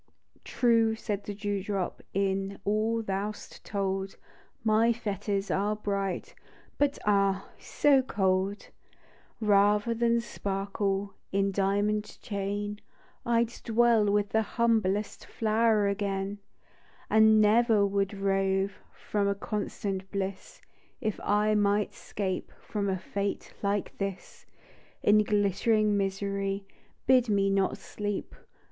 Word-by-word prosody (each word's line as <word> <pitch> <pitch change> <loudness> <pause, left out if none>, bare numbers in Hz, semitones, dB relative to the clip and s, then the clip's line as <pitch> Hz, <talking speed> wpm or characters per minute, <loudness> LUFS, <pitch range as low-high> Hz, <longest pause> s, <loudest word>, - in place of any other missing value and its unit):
" - - -48
True," 230 -2 +2
said 205 -2 -4
the 205 - -5
dew 205 -1 -2
drop, 195 -3 -3
" - - -48
Is 195 0 0
all 220 +2 +1
thou 195 +1 -2
'st - - -13
told, 195 -1 -2 0.5
My 220 +1 +4
fetters 205 -3 -2
are 205 +2 +1
bright 200 -3 -3 0.2
— - - -29
But 290 -1 +2
ah, 195 -1 +2
so 280 -2 +3
cold! 195 -3 0 0.4
" - - -31
Bather 210 +1 +3
than 235 0 +2
sparkle 200 -2 -2 0.2
In 195 0 +1
diamond 205 +2 0
chain, 205 +1 -3 0.5
I'd 235 -1 +3
dwell 230 -2 +3
with 205 0 +1
the 220 - +2
humblest 215 -3 0
THE - - -15 0.2
DEW 215 -2 +3
DROP. 200 0 -2 0.7
And 220 0 +6
never 215 0 +4
would 200 0 0
rove 195 0 0 0.2
From 205 -1 -1
a 200 - +1
constant 200 -2 -4
bliss, 195 -1 -5 0.4
If 215 -5 -2
I 210 +1 +2
might 205 0 +2
'scape 190 -3 -4
From 200 -2 -3
a 190 - 0
fate 200 +2 -4
like 200 0 -1
this; 195 -2 -5 0.6
In 210 +1 +6
glittering 210 +1 +2
misery 195 0 -2 0.4
Bid 255 -2 +4
me 195 -1 +2
not 195 -1 +1
sleep 205 -1 -5
205 Hz, 125 wpm, -29 LUFS, 195-215 Hz, 0.7 s, And